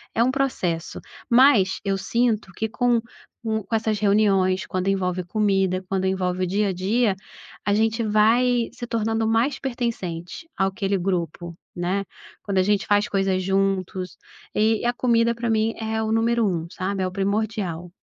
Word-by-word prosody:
é 230 - +4
um 255 - +2
processo, 190 -12 -2 0.3
mas 235 -6 +5
eu 195 -1 0
sinto 230 -4 0
que 220 - -2
com 240 +1 +1 0.4
com 220 -1 -1
com 210 +4 -2
essas 220 -1 0
reuniões, 200 -2 +2
quando 185 -3 -3
envolve 185 -2 0
comida, 195 -1 +1
quando 190 -1 -1
envolve 185 -1 -1
o - - -4
dia 200 +2 +1
a 190 - -1
dia, 200 +3 +1 0.5
a 205 - +1
gente 225 +2 +1
vai 230 +3 +3
se 240 - -7
tornando 225 -1 0
mais 230 +5 +1
pertencente 235 - -4
àquele 195 +1 0
grupo, 175 -2 -3 0.2
né, 185 +3 -1 0.4
quando 200 -2 -3
a 185 - +5
gente 205 0 +1
faz 205 0 +3
coisas 195 -1 0
juntos 190 -1 -1 0.4
e 220 +1 +2
a 240 - +3
comida, 235 -2 +2
pra 235 0 -3
mim, 220 0 +1
é 220 0 -2
o 220 0 -1
número 230 +1 +2
1, 170 -5 -1
sabe, 190 +1 -2
é - - 0
o 185 - -5
primordial. 195 -3 -2
205 Hz, 165 wpm, -23 LUFS, 185-225 Hz, 0.5 s, mas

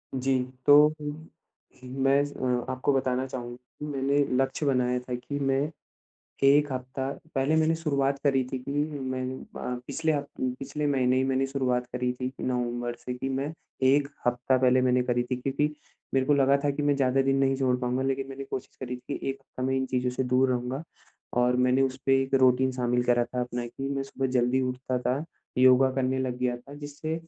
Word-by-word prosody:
जी, 130 0 +1 0.3
तो 145 - +8 0.3
हुँ, 150 +2 -6 0.5
मैं 135 +2 +2
अ, 125 -3 -2
आपको 130 +2 0
बताना 130 -1 0
चाहूँगा 125 +2 -8
मैंने 140 0 0 0.2
लक्ष्य 135 +3 0
बनाया 125 -2 +2
था 125 0 -5
कि 135 +4 -5
मैं, 135 +2 +1 0.7
1 145 +1 +5
हफ़्ता, 130 +1 -3 0.2
पहले 135 +3 +2
मैंने 160 +1 +3
शुरुआत 140 -4 0
करी 135 -2 +3
थी 130 - -1
की 130 +2 -6 0.3
मैं 130 -1 -3 0.4
अ, 125 - -3
पिछले 160 -1 0
हफ़ 145 -1 -1 0.3
पिछले 145 +2 -3
महीने 130 -2 +2
ही 130 - +2
मैंने 135 0 +1
शुरुआत 125 -2 0
करी 125 0 -1
थी 125 - -1
की 130 - -10
नवम्बर 120 -1 -1
से 125 - -3
कि, 125 +2 -4
मैं 135 +3 -2 0.3
1 140 +1 +4 0.2
हफ़्ता 125 +2 +2
पहले 130 0 +4
मैंने 125 0 +3
करी 120 -1 +1
थी, 125 +1 -3
क्योंकि 140 +4 -1 0.4
मेरे 130 -1 +2
को 145 - +4
लगा 140 0 +4
था 145 - +3
कि 140 +1 -2
मैं 145 0 +3
ज़्यादा 135 0 +2
दिन 135 0 +2
नहीं 135 0 +2
छोड़ 130 -2 +2
पाऊँगा। 125 +1 0
लेकिन 135 0 -1
मैंने 135 0 -6
कोशिश 130 -1 -6
करी 125 -1 -4
थी - - -14 0.2
कि - - -4
1 135 - -6
हफ़्ता 130 -1 -9
मैं 130 +1 +1
इन 130 - +1
चीज़ों 125 -1 0
से 130 +1 -2
दूर 130 +1 +3
रहूँगा। 125 +3 -2 0.6
और 125 0 +3
मैंने 125 +1 +3
उस 130 -1 0
पे 135 0 +5
एक 135 - -3
रूटीन 130 +1 +4
शामिल 125 -1 0
करा 120 -1 +3
था 125 +1 -4
अपना 120 0 -3
कि 135 +3 -5
मैं 135 - -1
सुबह 135 0 -3
जल्दी 125 +2 +2
उठता 125 0 -2
था, 130 +5 -1 0.3
योगा 130 +1 +6
करने 130 0 0
लग 130 -1 -2
गया 125 -1 0
था, 135 +4 -13
जिससे 145 +2 -5
130 Hz, 200 wpm, -27 LUFS, 125-135 Hz, 0.7 s, तो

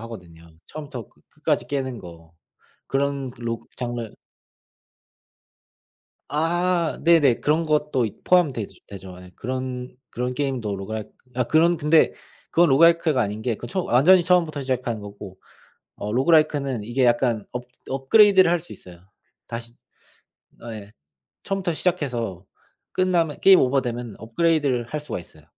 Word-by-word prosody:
하거든요. 90 -8 -11 0.2
처음부터 145 -7 -8
끄 - - -30
끝까지 - - -1
깨는 130 -3 -3
거. 85 -3 -13 0.5
그런 140 -1 -1
로 115 -1 -3 0.2
장르 120 -3 -4 2.2
아 170 +2 0
네네. 160 -7 +4
그런 155 +3 +1
것도 150 -4 +1
이 105 - -7
포함되지 145 - +1
되죠. 95 -2 -10
예. 90 0 -13
그런 130 0 -4 0.2
그런 125 +1 -3
게임도 125 -7 -2
로그라이크 105 +2 -6 0.2
아 125 0 +1
그런 165 +6 +3
근데 155 +1 +3 0.4
그건 170 -1 +4
로그라이크가 165 0 +4
아닌 105 -1 -2
게 120 -1 0
그 - - -8
처음 185 -1 -3
완전히 165 +10 +5
처음부터 165 -5 +2
시작하는 125 -4 -2
거고. 100 -2 -10 0.6
어 105 +1 -4
로그라이크는 140 -3 +2
이게 125 +4 0
약간 120 -3 +2
업 125 0 -5 0.3
업그레이드를 185 +7 +5
할 175 - +2
수 170 - -14
있어요. 90 -2 -12 0.5
다시 115 0 -7 1.0
예 105 -1 -10 0.5
처음부터 195 -3 -2
시작해서 125 - -2 0.5
끝나면 175 -5 +1
게임 190 -1 +7
오버되면 125 -4 -1
업그레이드를 140 +1 +1
할 150 - -4
수가 150 - -5
있어요. 80 -3 -16
130 Hz, 315 characters per minute, -23 LUFS, 115-160 Hz, 2.2 s, 게임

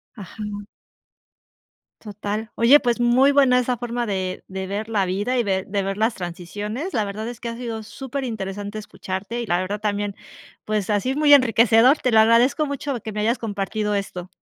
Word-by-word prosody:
Ajá. 210 0 -9 1.6
Total. 210 +1 -5
Oye, 245 +6 +6
pues, 240 -3 0
muy 245 +3 +4
buena 270 -3 +4
esa 250 0 +1
forma 240 0 -3
de 190 -3 -3
de 190 0 -5
ver 205 +3 -3
la 210 -4 +1
vida, 205 +7 -1
y - - +2
ver 190 -2 -1
de 200 0 -1
ver 195 0 -3
las 220 +2 +1
transiciones. 205 - -5
La 220 - +1
verdad 210 +3 -5
es 240 -1 -7
que 235 - -5
ha 230 - -5
sido 230 -2 -5
superinteresante 215 -4 -5
escucharte, 205 +2 -5
y 235 - -5
la 175 - +2
verdad 195 +3 -3
también, 205 -1 -2 0.5
pues, 210 -2 -2
ha 205 - +3
sido 260 +6 -2
muy 300 -1 +6
enriquecedor. 240 0 +5
Te 255 - 0
lo 220 - +5
agradezco 235 +7 +4
mucho, 280 -2 -3
que 220 - -6
me 210 0 -3
hayas 230 +4 +1
compartido 210 -1 -2
esto. 185 -3 -4
220 Hz, 185 wpm, -22 LUFS, 200-240 Hz, 1.6 s, Oye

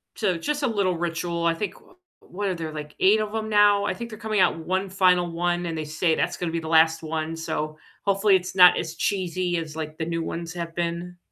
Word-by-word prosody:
So, 190 -6 0
just 295 - -2
a - - +3
little 200 -6 0
ritual 170 0 -2
I 170 - +3
think, 195 +3 -5
wha - - -21 0.3
what 200 +3 -5
are 185 - -1
there, 165 -2 -5
like 150 -1 -7
8 205 +3 +5
of 215 0 -3
'em 220 0 -2
now? 205 -1 +5
I - - 0
think 235 0 -7
they're 215 - -9
coming 215 -2 -1
out 180 -3 +3
1 185 +4 -2
final 180 -2 +3
one, 175 +1 -1
and 165 -1 -3
they 155 - -2
say 155 +2 0
that's - - -1
gonna 175 -2 -3
be 165 - -1
the 160 - -7
last 160 0 +4
one, 160 0 -3
so, 155 -1 -4 0.3
hopefully 200 0 +4
it's 185 0 -2
not 180 -1 +8
as 165 0 -4
cheesy 185 -2 -1
as 160 -2 -5
like 155 -1 -5
the 160 - -2
new 165 0 -2
ones 170 +1 -5
have 170 -1 -5
been. 175 +1 -3
175 Hz, 245 wpm, -25 LUFS, 165-195 Hz, 0.3 s, not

